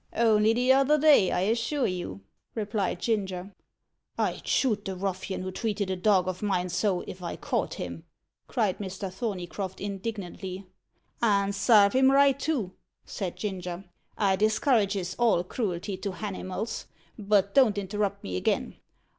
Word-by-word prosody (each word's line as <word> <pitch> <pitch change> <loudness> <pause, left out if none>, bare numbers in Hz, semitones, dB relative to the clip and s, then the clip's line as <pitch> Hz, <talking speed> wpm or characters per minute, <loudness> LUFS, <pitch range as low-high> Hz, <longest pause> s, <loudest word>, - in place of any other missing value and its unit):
"Only 220 -1 +4
t'other 265 +4 +4
day, 290 -10 +5
I - - +1
assure 235 +7 0
you," 175 - -4 0.3
replied 205 -4 -1
Ginger. 195 -4 -2 0.6
"I'd - - -2
shoot 215 -6 +1
the 190 - -4
ruffian 190 0 -3
who 185 - -4
treated 205 -2 -2
a - - 0
dog 185 -1 +3
of 185 -1 -3
mine 185 -3 0
so, 185 0 0
if 185 - -9
I 170 - -4
caught - - -2
him!" - - -6 0.4
cried 215 -7 0
Mr. 190 -1 -5
Thorneycroft 190 -3 -4
indignantly. 195 -2 -5 0.6
"And 200 -3 +2
sarve 200 0 +5
him 265 0 +5
right, 275 0 +5
too," 265 - -1 0.3
said 185 -4 -4
Ginger. 185 -2 -5 0.3
"I 195 -2 +3
discourages 210 - +1
all 230 -7 +3
cruelty 190 -1 -3
to 195 0 -4
hanimals. 200 +1 -5 0.3
But 200 -1 +2
don't 250 -7 +5
interrupt 200 0 -2
me 90 -1 -3
again. - - -1
200 Hz, 140 wpm, -27 LUFS, 185-220 Hz, 0.6 s, day